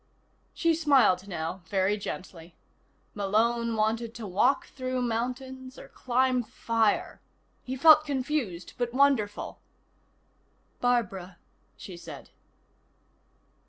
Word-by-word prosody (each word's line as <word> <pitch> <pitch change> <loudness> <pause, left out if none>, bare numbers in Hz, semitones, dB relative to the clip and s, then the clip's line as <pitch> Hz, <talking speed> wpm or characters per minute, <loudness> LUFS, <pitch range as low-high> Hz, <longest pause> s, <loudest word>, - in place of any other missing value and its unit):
She 335 -1 +2
smiled 265 - +3
now, 170 0 -4
very 195 0 +1
gently. 180 -4 -8 0.6
Malone 225 +3 +1
wanted 225 +2 -1
to 230 - -7
walk 210 +8 +2
through 255 -1 -3
mountains, 255 +3 -4
or - - -11
climb 255 0 +1
fire. 225 -1 -1 0.4
He 260 - -5
felt 305 +3 +7
confused, 265 - -3
but 240 0 -2
wonderful. 265 -7 +1 1.2
"Barbara," 200 -7 -1 0.4
she 185 -3 -9
said. - - -10
235 Hz, 95 wpm, -28 LUFS, 200-260 Hz, 1.2 s, felt